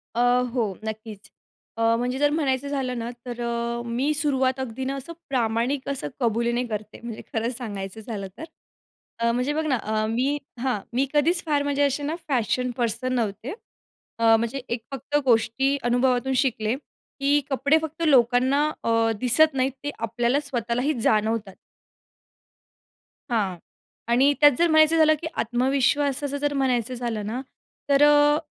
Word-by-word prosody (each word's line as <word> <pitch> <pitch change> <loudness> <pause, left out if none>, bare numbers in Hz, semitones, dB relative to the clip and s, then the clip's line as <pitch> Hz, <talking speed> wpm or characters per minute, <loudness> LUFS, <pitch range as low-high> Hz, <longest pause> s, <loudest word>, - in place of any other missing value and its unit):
अ, - - -1 0.3
हो. 225 -6 0
नक्कीचं. 220 -1 -7 0.5
अ, 230 0 +3
म्हणजे 250 +2 -2
जर 290 0 +4
म्हणायचं 285 -3 0
झालं 265 -3 -2
ना. 230 +1 -4 0.2
तर 240 -1 -6
अ, 235 0 -2
मी 250 +6 0
सुरुवात 265 -3 0
अगदी 260 0 -4
ना 270 +1 -2
असं 275 +5 -7 0.2
प्रामाणिक 250 +2 0
असं 275 -1 -3
कबुलीने 235 0 +1
करते. 215 -1 -6
म्हणजे 235 -2 -6
खरं 225 +1 0
सांगायचं 205 -3 -6
झालं 210 -3 -5
तर - - -7 0.8
अ, 235 0 +2
म्हणजे 250 +5 0
बघ 315 +1 -1
ना, 285 -4 +2
अ, 215 0 0
मी 255 +6 0 0.2
हां. 250 -3 0
मी 260 +3 +2
कधीच 330 +4 +2
फार 295 -2 +1
म्हणजे 285 0 +1
असे 280 +1 0
ना 300 +3 -2
फॅशन 250 -1 0
पर्सन 240 +1 -1
नव्हते. 225 +1 -2 0.7
अ, 225 -1 +6
म्हणजे 235 +4 -3
एक 235 0 -2
फक्त 275 +2 -2
गोष्टी 250 +3 +2
अनुभवातून 245 +1 +2
शिकले 235 -4 +1 0.4
की 280 +1 +3
कपडे 280 +3 +3
फक्त 320 +1 -6
लोकांना 260 +2 +4 0.2
अ, 230 0 +2
दिसत 265 +6 +4
नाहीत. 265 0 +1
ते 290 - -2
आपल्याला 235 +4 0
स्वतःलाही 250 0 -1
जाणवतात. 215 -2 +1 1.8
हां. 200 -6 0 0.5
आणि 260 +5 +4
त्यात 290 0 +9
जर 345 - +5
म्हणायचं 315 0 +5
झालं 310 -1 +6
की 330 - -3
आत्मविश्वासाचं 270 +3 +1
जर 290 0 -1
म्हणायचं 255 -3 0
झालं 235 -4 -3
ना. 235 +5 -3 0.5
तर 280 0 +5
अ, 295 0 +5
250 Hz, 155 wpm, -24 LUFS, 230-280 Hz, 1.8 s, त्यात